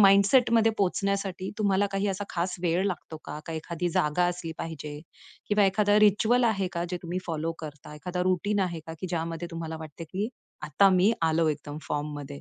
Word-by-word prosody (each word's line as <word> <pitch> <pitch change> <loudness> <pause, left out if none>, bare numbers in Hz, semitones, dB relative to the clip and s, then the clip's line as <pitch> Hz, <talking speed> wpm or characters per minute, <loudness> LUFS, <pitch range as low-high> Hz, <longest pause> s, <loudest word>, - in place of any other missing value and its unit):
माइंडसेटमध्ये 225 +3 +6
पोहोचण्यासाठी 195 -1 0
तुम्हाला 200 -1 +3
काही 195 +1 0
असा 195 +1 -2
खास 175 +1 -1
वेळ 175 +2 +2
लागतो 170 -4 -4
का? - - -6
एखादी 170 +2 -3
जागा 150 +2 +2
असली 175 -2 -3
पाहिजे 150 -2 -6 0.5
किंवा 205 -1 +4
एखादा 205 +2 +3
रिच्युअल 215 +4 +4
आहे 200 -5 +1
का 170 -1 -1
जे 180 - -1
तुम्ही 175 +1 -3
फॉलो 165 0 -2
करता? 150 -1 -9
एखादा 180 +4 -3
रूटीन 185 +3 +1
आहे 175 -3 -1
का? 160 - -6
की 185 - -3
ज्यामध्ये 165 0 -3
तुम्हाला 165 -1 -5
वाटत, 160 +1 -8
की 205 +4 -1 0.3
आता 155 +6 +4
मी 190 +4 +4
आलो 160 0 +3
एकदम 145 0 -5
फॉर्ममध्ये. 145 -1 -3
180 Hz, 175 wpm, -28 LUFS, 160-200 Hz, 0.5 s, माइंडसेटमध्ये